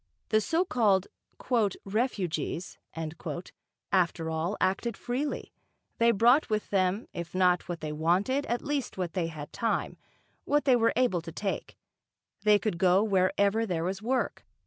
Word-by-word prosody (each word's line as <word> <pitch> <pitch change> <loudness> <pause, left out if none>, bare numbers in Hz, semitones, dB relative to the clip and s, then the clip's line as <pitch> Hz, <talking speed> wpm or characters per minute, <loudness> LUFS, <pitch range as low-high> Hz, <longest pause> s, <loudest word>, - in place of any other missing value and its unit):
The 215 -1 +3
so 335 - +1
called 205 - +2 0.8
"refugees," 195 -5 -2 1.1
after 170 -3 +1
all, 165 +5 -1
acted 200 +4 0
freely; 265 +4 -3 0.5
they 230 0 +5
brought 235 +6 +4
with 215 -1 -2
them, 190 +2 +1
if 170 +1 -6
not 180 -1 +2
what 175 -1 -4
they 155 -1 -3
wanted 185 - +1
at 240 +1 -1
least 285 -6 -2
what 180 -3 -3
they 180 -3 0
had 155 -3 -8
time, 230 -1 -1 0.5
what 295 -1 +1
they 260 -3 +6
were 230 -1 +3
able 240 -9 +2
to 165 0 -8
take; 195 +3 -4 0.6
they 210 0 +5
could 205 -5 -2
go 185 +2 +4
wherever 200 +2 +2
there 170 -4 -1
was 190 +3 -2
work. 255 +4 -1
200 Hz, 145 wpm, -29 LUFS, 180-235 Hz, 1.1 s, they